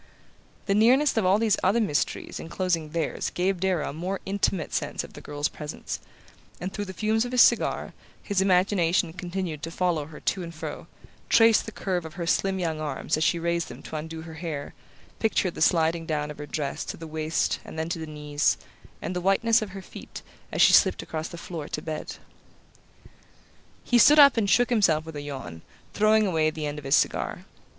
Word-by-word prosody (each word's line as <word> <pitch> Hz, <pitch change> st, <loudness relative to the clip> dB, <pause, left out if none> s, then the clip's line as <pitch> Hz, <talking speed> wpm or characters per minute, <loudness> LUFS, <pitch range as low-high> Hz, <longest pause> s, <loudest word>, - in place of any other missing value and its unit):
The 195 Hz, -, +1 dB
nearness 255 Hz, +8 st, +4 dB
of 220 Hz, -5 st, +2 dB
all 190 Hz, +2 st, +5 dB
these 220 Hz, -2 st, +2 dB
other 200 Hz, +6 st, +3 dB
mysteries 175 Hz, -10 st, -1 dB
enclosing 165 Hz, -2 st, -2 dB
theirs 160 Hz, -1 st, -2 dB
gave 185 Hz, +1 st, -1 dB
Darrow 185 Hz, -6 st, 0 dB
a -, -, -10 dB
more 180 Hz, +5 st, -3 dB
intimate 195 Hz, -3 st, -1 dB
sense -, -, -2 dB
of -, -, -12 dB
the -, -, -10 dB
girl's 145 Hz, 0 st, -2 dB
presence, 150 Hz, -1 st, -6 dB, 0.6 s
and 185 Hz, +2 st, -5 dB
through 205 Hz, -, -3 dB
the 190 Hz, -, -7 dB
fumes 220 Hz, +4 st, +1 dB
of 245 Hz, -, -5 dB
his 250 Hz, -1 st, +7 dB
cigar -, -, +1 dB, 0.3 s
his 200 Hz, -2 st, 0 dB
imagination 180 Hz, -3 st, +2 dB
continued 180 Hz, -3 st, -4 dB
to 165 Hz, -, -4 dB
follow 165 Hz, -3 st, -1 dB
her 155 Hz, -1 st, -11 dB
to 190 Hz, -, -1 dB
and 170 Hz, -1 st, -7 dB
fro, 155 Hz, -, -7 dB, 0.4 s
traced 225 Hz, 0 st, +5 dB
the -, -, -5 dB
curve 185 Hz, -5 st, -2 dB
of 160 Hz, 0 st, -9 dB
her 170 Hz, -, -4 dB
slim 190 Hz, +3 st, +1 dB
young 165 Hz, -4 st, -2 dB
arms 145 Hz, -3 st, -2 dB
as 155 Hz, -, 0 dB
she 170 Hz, -, +2 dB
raised 170 Hz, 0 st, -1 dB
them 120 Hz, -, -11 dB
to -, -, -8 dB
undo 160 Hz, +1 st, -5 dB
her 165 Hz, -1 st, -9 dB
hair, 155 Hz, -3 st, -5 dB, 0.5 s
pictured 200 Hz, -5 st, +1 dB
the -, -, -8 dB
sliding 165 Hz, -1 st, +2 dB
down 150 Hz, -1 st, -2 dB
of 150 Hz, -, -11 dB
her 145 Hz, -, -6 dB
dress 145 Hz, -3 st, -3 dB
to -, -, -6 dB
the 165 Hz, -, -8 dB
waist 155 Hz, +1 st, -1 dB
and -, -, -10 dB
then 160 Hz, 0 st, -2 dB
to 170 Hz, 0 st, -3 dB
the 160 Hz, -, -6 dB
knees, 150 Hz, -1 st, 0 dB, 0.5 s
and 180 Hz, -, -3 dB
the 180 Hz, -, -1 dB
whiteness 220 Hz, +5 st, +3 dB
of 215 Hz, -, -4 dB
her 190 Hz, 0 st, -9 dB
feet -, -, -10 dB, 0.3 s
as -, -, +3 dB
she -, -, +6 dB
slipped -, -, +5 dB
across 160 Hz, 0 st, -4 dB
the 170 Hz, -, -9 dB
floor 165 Hz, -3 st, -6 dB
to -, -, -4 dB
bed... 155 Hz, 0 st, -5 dB, 1.7 s
He 245 Hz, -, +3 dB
stood 295 Hz, +6 st, +7 dB
up 280 Hz, -2 st, +8 dB
and 215 Hz, -4 st, +1 dB
shook 245 Hz, +4 st, +3 dB
himself 170 Hz, -9 st, +3 dB
with 160 Hz, -1 st, -9 dB
a 145 Hz, -, -4 dB
yawn, 130 Hz, -, -7 dB, 0.3 s
throwing 215 Hz, +1 st, +4 dB
away 160 Hz, -5 st, +2 dB
the 155 Hz, -1 st, -5 dB
end 145 Hz, 0 st, -4 dB
of 145 Hz, -, -13 dB
his 135 Hz, -, +4 dB
cigar. -, -, 0 dB
170 Hz, 205 wpm, -26 LUFS, 155-195 Hz, 1.7 s, up